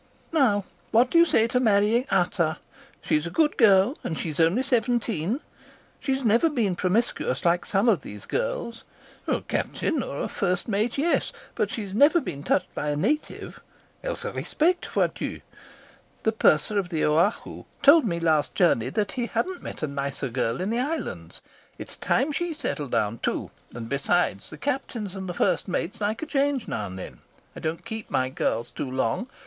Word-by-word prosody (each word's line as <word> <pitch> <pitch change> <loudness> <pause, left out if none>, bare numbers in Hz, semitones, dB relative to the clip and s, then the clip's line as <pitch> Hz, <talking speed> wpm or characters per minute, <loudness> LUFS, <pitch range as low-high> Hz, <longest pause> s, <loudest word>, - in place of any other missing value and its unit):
"'Now, 230 - +3 0.2
what 245 +3 +4
do 335 - +5
you 340 - +8
say 225 - +4
to 250 +2 +1
marrying 220 +2 +3
Ata? 175 -3 +1 0.5
She's 150 +2 +1
a - - -4
good 305 - +2
girl 210 +2 +5
and 160 - -3
she's 155 -2 -4
only 170 +10 +3
seventeen. 235 - 0 0.6
She's 270 -2 -1
never 230 +9 +4
been 225 - 0
promiscuous 185 - 0
like 175 +1 +2
some 200 +4 +2
of 200 -11 +4
these 105 -4 -9
girls - - -3 0.4
a - - +1
captain 315 -6 -1
or 140 - -5
a - - -1
first 180 -2 -1
mate, 220 +3 0
yes, 325 +5 +1 0.2
but - - 0
she's 205 -4 -5
never 290 - +5
been 175 - -6
touched 185 +5 0
by 150 - -2
a 145 - 0
native.. 265 - -2 0.4
The - - -2 2.3
purser 200 +7 +3
of 185 -3 -3
the 165 +4 +1 0.3
told 295 +3 +8
me 170 -5 -1
last 160 -3 +1
journey 165 - +3
that 210 -2 -1
he 245 -3 -2
hadn't 370 +7 -2
met - - -7
a - - +1
nicer 140 -1 -3
girl 120 +4 -1
in 195 +4 -1
the 235 - 0
islands. 300 +6 -4 0.4
It's - - -6
time 285 +3 +1
she 335 +2 -2
settled 145 - -3
down 110 -1 0
too, - - -2 0.2
and 115 -1 -7
besides, 140 - 0
the - - -10
captains 245 -8 -3
and 190 -1 -5
the 175 - -4
first - - +1
mates 190 +4 -3
like 215 +6 -1
a - - -2
change 280 -4 0
now 105 -3 -3
and 95 0 -8
then. 95 - -8 0.4
I - - -7
don't 165 +2 -4
keep 220 -1 -6
my 130 0 +1
girls 115 -3 -2
too 135 - -4
long. 130 - -1
205 Hz, 175 wpm, -25 LUFS, 160-255 Hz, 2.3 s, you